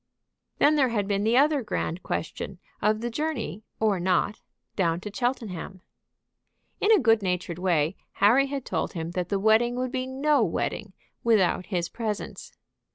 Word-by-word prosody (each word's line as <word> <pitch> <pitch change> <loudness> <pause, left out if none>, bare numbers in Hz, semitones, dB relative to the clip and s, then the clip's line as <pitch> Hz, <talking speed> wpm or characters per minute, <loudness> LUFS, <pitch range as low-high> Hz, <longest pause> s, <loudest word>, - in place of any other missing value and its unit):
Then 300 +1 +4
there 265 -3 +4
had 205 -4 -1
been 200 0 0
the 225 +3 +3
other 290 +1 +4
grand 185 -5 -3
question 180 +4 -4 0.2
of 215 +1 +2
the 240 0 -3
journey, 265 -7 -3 0.2
or 210 -4 +2
not, 185 +3 +1 0.3
down 170 -3 +1
to 210 - -6
Cheltenham. 205 -7 -3 1.0
In 425 - +3
a 440 - +8
good 225 - +4
natured 180 -2 -2
way 170 -2 +1 0.2
Harry 250 +7 +4
had 275 -2 -4
told - - -2
him 165 -2 -4
that 180 0 -3
the 200 - +1
wedding 220 +4 +3
would 255 0 -2
be 255 0 -2
no 280 +3 +2
wedding - - -2 0.3
without 200 -5 +2
his 175 -4 -1
presence. 220 -3 -5
215 Hz, 160 wpm, -26 LUFS, 185-255 Hz, 1.0 s, a